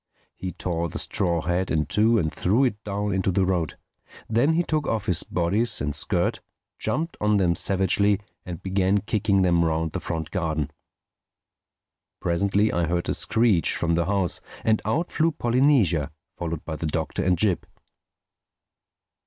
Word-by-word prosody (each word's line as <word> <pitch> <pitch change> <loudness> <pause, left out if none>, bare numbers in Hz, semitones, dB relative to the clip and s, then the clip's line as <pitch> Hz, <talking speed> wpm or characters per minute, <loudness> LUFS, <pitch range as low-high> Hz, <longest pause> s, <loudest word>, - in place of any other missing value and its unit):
He 95 - -5
tore 85 -2 -2
the - - -6
straw 85 -5 0
hat 90 +2 -1
in 75 -1 +1
two 110 +2 +3
and 80 -7 0
threw 110 +9 +2
it 110 -5 -1
down 100 0 -2
into 95 0 0
the 95 +1 +2
road. 90 -5 -1 0.5
Then 120 +8 +2
he 170 +2 +2
took 155 -3 -1
off 110 -2 -1
his 90 -6 +2
bodice 105 +6 +1
and 75 0 -2
skirt, 75 - 0 0.4
jumped 165 +4 -2
on 105 0 +3
them 90 -3 +2
savagely 100 +3 +2 0.2
and 85 -2 -8
began 95 +1 +1
kicking 100 -1 +1
them 85 -2 +3
round 80 0 0
the - - -3
front 80 -2 -4
garden. 80 -6 -2 1.5
Presently 100 +4 +1
I 85 -1 +1
heard 85 +1 -1
a - - +2
screech 110 -8 +2
from 85 -1 0
the 85 0 +1
house, 95 -4 0 0.2
and 110 -1 +2
out 165 +4 -1
flew 165 +1 +2
Polynesia, 120 - +2 0.2
followed 85 -3 -5
by 80 -1 -4
the 80 - -3
Doctor 80 0 -2
and 90 0 +2
Jip. 95 0 +1
95 Hz, 160 wpm, -24 LUFS, 85-105 Hz, 1.5 s, two